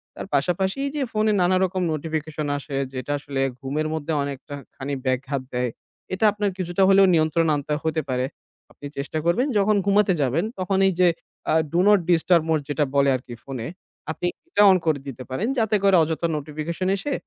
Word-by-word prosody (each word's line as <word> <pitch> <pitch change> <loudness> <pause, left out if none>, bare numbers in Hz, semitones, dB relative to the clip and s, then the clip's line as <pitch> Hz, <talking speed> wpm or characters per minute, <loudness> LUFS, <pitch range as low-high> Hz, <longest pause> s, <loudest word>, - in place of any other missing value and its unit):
তার - - -7
পাশাপাশি 180 - 0
এই 280 - -2
যে 295 - -1
ফোনে 215 0 +2
নানারকম 185 +1 +2
নোটিফিকেশন 155 0 -3
আসে 145 0 -7 0.2
যেটা 130 +2 -4
আসলে 140 -1 -3 0.2
ঘুমের 145 +3 -2
মধ্যে 160 0 -3
অনেকটাখানি 140 0 -7
ব্যঘাত 130 +1 -1
দেয়। 125 0 0 0.4
এটা 190 +4 +1
আপনার 205 0 -1
কিছুটা 185 +1 0
হলেও 195 0 +7
নিয়ন্ত্রণে 160 0 +2
আনতে 145 +1 -3
হতে 160 0 0
পারে। 125 0 0 0.5
আপনি - - -13
চেষ্টা 140 +3 -3
করবেন 195 +11 +2
যখন 210 +1 +3
ঘুমাতে 200 -1 +3
যাবেন 140 +7 +1
তখন 190 +1 0
এই 190 - -1
যে 180 - +6 0.6
Do 175 - +3
not 205 -1 +6
disturb 170 -1 +4
mode 155 -2 +1
যেটা 145 0 +1
বলে 140 0 +4
আরকি 125 -1 -7
ফোনে, 130 -4 -5 0.4
আপনি - - -5 0.2
এটা 275 - +2
on 185 - +5
করে 155 -3 +2
দিতে 130 -1 -7
পারেন 160 - -2
যাতে 220 -1 +2
করে 195 -1 +5
অযথা 160 +2 -1
নোটিফিকেশন 155 +5 -4
এসে 280 +9 -3
160 Hz, 175 wpm, -23 LUFS, 140-190 Hz, 0.6 s, হলেও